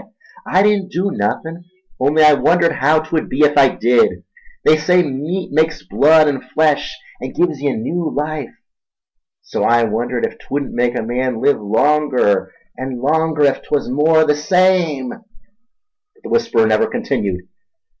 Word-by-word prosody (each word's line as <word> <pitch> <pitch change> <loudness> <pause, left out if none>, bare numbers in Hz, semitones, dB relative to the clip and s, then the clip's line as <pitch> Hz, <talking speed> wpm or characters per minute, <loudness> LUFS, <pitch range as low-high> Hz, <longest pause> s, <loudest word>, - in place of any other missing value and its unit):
—I 190 - +2
didn't 205 -2 0
do 190 +3 -2
nothin', 165 -2 -4 0.4
only 145 +4 +2
I 150 0 +7
wondered 170 +3 +2
haow 155 +3 +2
'twud 160 0 -3
be 145 +3 +1
ef 145 0 +3
I 140 -2 +6
did— 120 0 +1 0.4
They 155 - +6
say 180 +4 +2
meat 155 +6 -4
makes 160 +2 0
blood 155 +1 +4
an' 140 -3 -1
flesh, 150 +3 -1 0.2
an' 130 +1 -6
gives 160 -6 -1
ye 145 -1 0
new 165 +9 -3
life, 150 -3 -4 0.9
so - - -4
I 120 0 +3
wondered 120 +2 -2
ef - - -8
'twudn't 140 0 -5
make 120 0 0
a - - -3
man 125 +1 -2
live 140 -3 +1
longer 125 -1 +1 0.3
an' 130 -1 -5
longer 155 +2 0
ef 140 - 0
'twas 145 -4 -2
more 155 +4 +3
the 150 - +2
same—" 165 -4 +1
But 250 - -22
the - - -8
whisperer 230 - +2
never 110 0 +2
continued. 95 -3 -3
150 Hz, 155 wpm, -17 LUFS, 130-170 Hz, 0.9 s, I